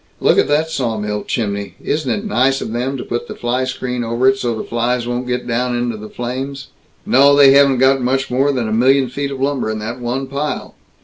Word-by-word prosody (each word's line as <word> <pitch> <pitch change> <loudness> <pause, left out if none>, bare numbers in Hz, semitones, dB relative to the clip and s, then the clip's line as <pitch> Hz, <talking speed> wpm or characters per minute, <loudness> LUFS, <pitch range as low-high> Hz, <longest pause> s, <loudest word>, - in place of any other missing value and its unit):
Look - - +3
at - - +3
that 155 +2 +1
sawmill 105 -6 -2
chimney 100 -3 -3
isn't 150 -3 -2
it 205 - -2
nice 135 -9 +2
of 110 - -5
'em 130 +3 -2
to 125 - -5
put 120 - -4
the - - -7
fly 125 +2 -1
screen 125 -1 -3
over 115 +3 +1
it 135 - +5
so 120 -3 -2
the 110 - -4
flies 120 +1 -1
won't 120 +1 -3
get 125 0 -2
down 125 +1 -1
into 120 -1 -2
the 105 0 -9
flames. 135 +4 -5 0.4
No, 140 +2 +5
they 140 -1 +7
haven't 140 -1 +5
got 130 +1 +3
much 135 +2 0
more 135 +3 +2
than 125 -5 -1
a 110 - -2
million 130 +3 +3
feet 140 +3 -3
of 135 -1 -6
lumber 135 -4 -1
in 110 - -2
that 115 +4 -5
one 125 +3 -2
pile. 140 +3 -4
125 Hz, 230 wpm, -18 LUFS, 120-135 Hz, 0.4 s, they